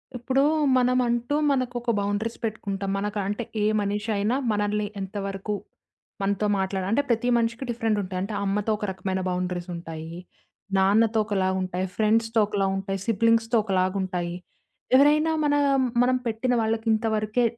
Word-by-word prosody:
ఇప్పుడు 260 +3 +1 0.4
మనమంటూ 250 +1 +1 0.2
మనకొక 245 -2 -1
బౌండరీస్ 205 +3 -2
పెట్టుకుంటాం. 200 -3 -3
మనకంటే 205 +2 -2 0.2
ఏ - - +3 0.2
మనిషైనా 210 +2 -1 0.2
మనల్ని 210 0 0
ఎంతవరకు 195 +1 -4 0.7
మనతో 200 +1 0
మాట్లాడాలి 190 0 -2
అంటే 280 +6 +3
ప్రతి 235 +1 +1
మనిషికి 230 +2 -1
డిఫరెంట్ 225 -2 0
ఉంటాయి. 185 -1 -4
అంటే 200 +3 -4
అమ్మతో 205 +2 0
ఒక 210 - -3
రకమైన 190 0 -3
బౌండరీస్ 180 0 -3
ఉంటాయి. 165 -1 -7 0.6
నాన్నతో 220 +4 +3
ఒకలాగుంటాయి 190 -2 -1
ఫ్రెండ్స్‌తో 225 +1 +2
ఒకలాగుంటాయి. 195 -1 -1
సిబ్లింగ్స్‌తో 230 +1 +3
ఒకలాగుంటాయి. 185 -3 -1 0.6
ఎవరైనా 300 +4 +5
మన 290 - +2 0.5
మనం 255 +1 +3
పెట్టిన 230 +3 0
వాళ్ళకి 225 +1 -1
ఇంతవరకే 220 +1 0
210 Hz, 120 wpm, -25 LUFS, 195-230 Hz, 0.7 s, ఎవరైనా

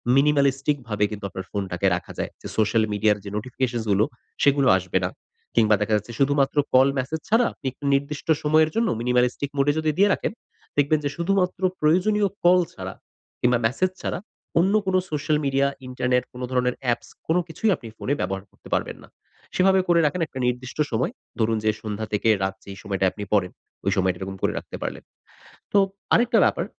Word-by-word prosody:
minimalistic 140 0 +3
ভাবে 105 -1 0
কিন্তু 105 -1 -6
আপনার 95 0 -7
ফোনটাকে 95 -1 -1
রাখা 90 - -6
যায়। - - -2
যে, - - -7
social 110 +1 +3
media 105 +1 +2
এর 105 - -7
যে, 100 - -6
notifications 120 0 -2
গুলো 100 +3 +4 0.4
সেগুলো 140 -1 +4
আসবে 95 0 -1
না - - -1 0.5
কিংবা 110 -2 +5
দেখা 110 +1 0
যাচ্ছে 105 +3 -7
শুধুমাত্র 140 +1 +2 0.2
call 130 +1 +7
message 155 +5 -3
ছাড়া 230 +3 +4
আপনি 135 - -7 0.3
নির্দিষ্ট 140 +1 -1 0.2
সময়ের 155 +1 +4
জন্য 230 0 +2
minimalistic 125 +3 +1
mode 140 +1 +3
এ - - -2
যদি 155 - 0
দিয়ে 200 +1 +5
রাখেন - - -2 0.5
দেখবেন 145 +1 +3
যে, - - +1
শুধুমাত্র 185 +1 +1 0.2
প্রয়োজনীয় 195 +7 +3 0.2
call 180 +1 +6
ছাড়া - - -6 0.5
কিংবা 125 0 +4
message 185 +11 +1
ছাড়া - - -2 0.4
অন্য 190 +4 +3
কোনো 185 -1 +2
social 150 0 +1
media, 140 0 +2 0.2
internet 125 -1 0
কোন 125 - -9
ধরনের 125 -1 +1 0.2
apps - - -3 0.2
কোন 165 +2 +2
কিছুই 175 +7 -1
আপনি 115 - -11
ফোনে 140 - -1
ব্যবহার 95 +1 -2
করতে - - -17
পারবেন - - -3
না। - - -23 0.5
সেভাবে 190 +1 +4
করে 170 -1 +4
রাখেন 160 +5 0
একটা 130 - -8
নির্দিষ্ট 125 +1 -3
সময় 115 +3 0 0.3
ধরুন 110 0 +2
যে, 110 - +3
সন্ধ্যা 110 0 -4
থেকে 105 +2 +2
রাত 95 0 -1
যেই 100 -1 -9
সময়টায় 95 -2 0
আপনি 105 - -7
পড়েন, 95 -3 +2 0.3
ওই 100 - +2
সময়টা 95 -1 +1
এরকম 95 0 -5
করে - - +1
রাখতে - - -7
পারলেন। - - -5 0.7
তো 205 - +5 0.4
আরেকটা 240 +1 +4
ব্যাপার, - - +1
130 Hz, 185 wpm, -24 LUFS, 105-155 Hz, 0.7 s, call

